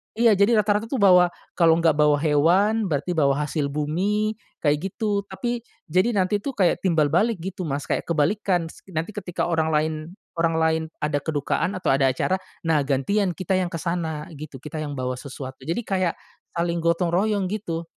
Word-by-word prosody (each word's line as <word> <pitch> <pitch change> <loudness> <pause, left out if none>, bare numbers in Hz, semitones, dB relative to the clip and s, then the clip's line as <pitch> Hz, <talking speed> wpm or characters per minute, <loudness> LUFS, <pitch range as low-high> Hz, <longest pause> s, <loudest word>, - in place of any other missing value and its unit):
iya 230 0 +5
jadi 215 +3 +4
rata-rata 210 +1 +1
tuh 265 - 0
bawa 180 -3 +6 0.3
kalau 165 -1 +4
nggak 165 -3 +3
bawa 150 -1 +4
hewan 175 +9 +3
berarti 160 +3 -1
bawa 140 -3 +3
hasil 145 -3 -1
bumi, 190 +9 0 0.3
kayak 150 +6 +1
gitu, 205 -2 0
tapi 240 +6 -3 0.3
jadi 185 +7 +3
nanti 200 +2 +2
tuh 275 +6 -4
kayak 185 -4 +2
timbal 160 -5 +3
balik 220 +7 +3
gitu 190 -1 -5
Mas, 140 0 -2
kayak - - -1
kebalikan 170 +2 +1
s - - -16 0.2
nanti 165 +6 -2
ketika 180 -4 -3
orang 160 -2 +1
lain 155 +1 +1 0.4
orang 165 -1 +1
lain 160 0 +2 0.2
ada 145 -1 +1
kedukaan 160 +6 -1
atau 180 - 0
ada 135 0 +3
acara, 185 +8 0 0.2
nah 160 -2 +2
gantian 175 +7 +1
kita 185 0 -5
yang 185 -1 +1
ke - - -5
sana 160 -3 -3
gitu, 145 -3 -9
kita 155 +1 -6
yang 145 -1 -5
bawa 125 0 -2
sesuatu, 130 -1 -8
jadi 170 +8 0
kayak, 185 -4 0 0.4
saling 170 0 0
gotong 170 +1 +1
royong 200 +1 +1
gitu. 170 -6 -3
170 Hz, 185 wpm, -24 LUFS, 150-195 Hz, 0.4 s, bawa